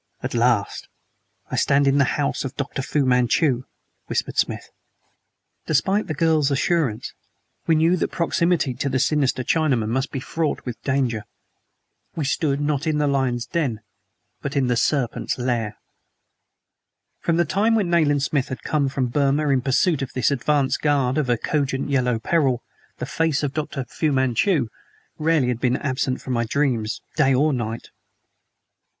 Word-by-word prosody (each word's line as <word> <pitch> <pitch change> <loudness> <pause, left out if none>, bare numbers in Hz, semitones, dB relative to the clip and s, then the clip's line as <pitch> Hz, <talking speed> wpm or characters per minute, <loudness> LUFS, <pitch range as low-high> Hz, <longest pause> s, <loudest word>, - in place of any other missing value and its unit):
"At - - -3
last 115 -3 +1 0.6
I - - -1
stand 140 0 +3
in 140 +1 +3
the 140 - +2
house 145 -1 -1
of 135 0 -5
Dr. 140 -1 -3
Fu 140 +1 0
Manchu!" 125 +1 +2 0.4
whispered - - -2
Smith. - - -1 1.0
Despite 190 +7 +1
the 155 - -3
girl's 155 -2 +2
assurance, 140 -5 0 0.5
we 165 - +4
knew 165 +3 +3
that - - 0
proximity 170 -4 +1
to 135 +3 -2
the 130 - 0
sinister 135 -1 +1
Chinaman 130 -8 +1
must 130 +3 -1
be 135 - -3
fraught 155 +3 -2
with 120 -2 -6
danger. 130 -5 -1 0.9
We 155 - -2
stood, 140 0 0
not 145 +1 -1
in 155 -1 +1
the 150 - +2
lion's 130 -4 0
den, 130 -10 -2 0.6
but 140 +2 -4
in 140 -2 +2
the 125 -1 +1
serpent's 125 0 0
lair. 120 -4 -2 1.4
From 170 -1 0
the 175 - +3
time 200 +8 +2
when 200 -6 +1
Nayland 145 -4 +3
Smith 140 -2 0
had 130 - -7
come 145 -3 0
from 135 -1 -1
Burma 140 +3 +1
in 135 -2 +3
pursuit 140 +4 +2
of 135 - -4
this 130 +2 +1
advance 140 0 +1
guard 140 -2 +1
of 140 -4 -1
a 120 - +3
cogent 140 +1 -1
Yellow 125 -3 +2
Peril, 130 0 +1 0.3
the - - -4
face 155 +1 0
of 140 -2 -1
Dr. 150 -3 -3
Fu 150 +5 -1
Manchu 130 - +2 0.5
rarely 155 -5 +2
had 120 -2 -1
been 125 +1 +1
absent 130 -2 -2
from 130 - -4
my 115 -1 0
dreams 120 -4 -1
day 135 -4 +4
or 150 +3 +2
night. 115 -2 -4
140 Hz, 165 wpm, -23 LUFS, 125-155 Hz, 1.4 s, we